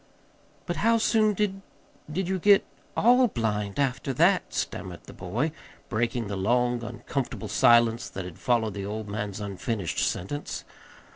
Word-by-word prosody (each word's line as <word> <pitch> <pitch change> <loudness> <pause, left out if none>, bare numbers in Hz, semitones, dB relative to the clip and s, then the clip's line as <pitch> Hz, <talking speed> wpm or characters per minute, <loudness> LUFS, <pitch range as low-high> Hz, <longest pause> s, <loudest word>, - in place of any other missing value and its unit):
"But 175 - -3
how 230 +1 +4
soon 215 -2 +3
did 195 -1 -1 0.5
did 185 +3 -1
you 190 0 -1
get 200 +2 +5 0.3
all 250 +2 +6
blind, 105 - -2
after 135 0 0
that?" 175 +7 +3
stammered - - -4
the - - -12
boy, 115 - -2 0.4
breaking 120 +1 0
the 100 -1 -4
long, 120 +4 +1
uncomfortable 120 0 -4
silence 115 +3 +4
that 95 -1 -6
had 90 -2 -9
followed 115 -4 +1
the 100 - -5
old 105 +2 -4
man's 105 -1 -4
unfinished 100 -1 -3
sentence. 145 +12 -2
120 Hz, 145 wpm, -27 LUFS, 105-175 Hz, 0.5 s, all